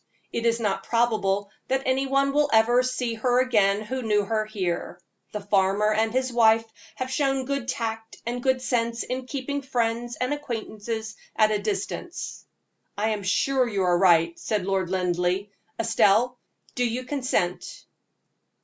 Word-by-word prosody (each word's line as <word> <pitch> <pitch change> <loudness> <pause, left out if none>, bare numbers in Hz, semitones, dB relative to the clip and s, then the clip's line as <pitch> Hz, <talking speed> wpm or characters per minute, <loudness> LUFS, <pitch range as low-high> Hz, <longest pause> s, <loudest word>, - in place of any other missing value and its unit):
It 235 0 0
is 230 0 +2
not 210 -4 -1
probable 205 -4 +1 0.2
that 265 +1 0
any 265 +1 +1
one 275 +1 +2
will 295 0 +3
ever 230 +3 +5
see 255 -2 -2
her 245 +2 +2
again 210 -5 +3
who 255 +4 -4
knew 210 -3 +1
her 215 +1 0
here. 180 -4 -3 0.3
The 210 - -4
farmer 200 +1 +2
and 220 +1 +1
his 255 +1 -1
wife 225 -1 +5 0.3
have 255 0 -4
shown 270 -1 +1
good 275 -2 -2
tact 225 -2 -4
and 240 +1 -3
good 260 0 +1
sense 235 -2 0
in 255 0 -4
keeping 280 +1 -3
friends 240 -2 -1
and 255 +3 -1
acquaintances 220 -5 -5 0.2
at 215 -1 +4
a 210 - +1
distance." 210 - -4 0.5
"I 215 +2 +1
am 215 -2 -1
sure 255 +7 +2
you 200 -4 -1
are 180 -1 +3
right," 170 -2 +4
said 210 -4 -1
Lord 190 -2 0
Linleigh. 180 +1 0 0.3
"Estelle, 230 +2 +3 0.3
do 250 - 0
you 245 +1 -1
consent?" 250 -10 -2
230 Hz, 160 wpm, -25 LUFS, 205-255 Hz, 0.5 s, ever